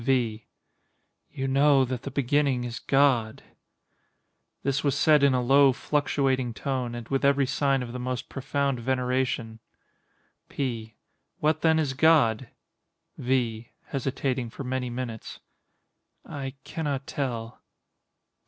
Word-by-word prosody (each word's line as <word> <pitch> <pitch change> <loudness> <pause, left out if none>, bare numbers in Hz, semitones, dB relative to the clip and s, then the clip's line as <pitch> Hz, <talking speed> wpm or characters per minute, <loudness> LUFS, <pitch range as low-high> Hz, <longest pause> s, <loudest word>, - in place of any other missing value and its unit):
V. 120 -4 0 0.8
You 135 - -4
know 135 0 +4
that 125 -1 -4
the - - -5
beginning 140 -1 +1
is 120 -1 -5
GOD. 130 -6 +2 1.2
[This 140 +1 0
was 140 -3 +1
said 150 -2 +5
in 140 -2 +4
a 125 - +1
low, 135 +1 +5
fluctuating 135 -4 0
tone, 125 -2 -3
and 120 -1 -7
with 135 0 0
every 140 0 +4
sign 135 0 +1
of 120 -1 -7
the 125 - -5
most 125 -1 -3
profound 140 -1 -2
veneration.] 125 -1 -1 0.9
P. 115 -5 -4 0.4
What 155 +1 +1
then, 160 -1 +4
is 150 -4 0
God? 130 -6 +3 0.7
V. 120 -3 -1 0.2
[Hesitating 130 -2 -2
for 135 - -8
many 125 -1 -2
minutes.] 120 -2 -6 0.9
I 135 -1 -6
cannot 145 -4 -3
tell. 120 -6 -4
130 Hz, 125 wpm, -26 LUFS, 120-140 Hz, 1.2 s, said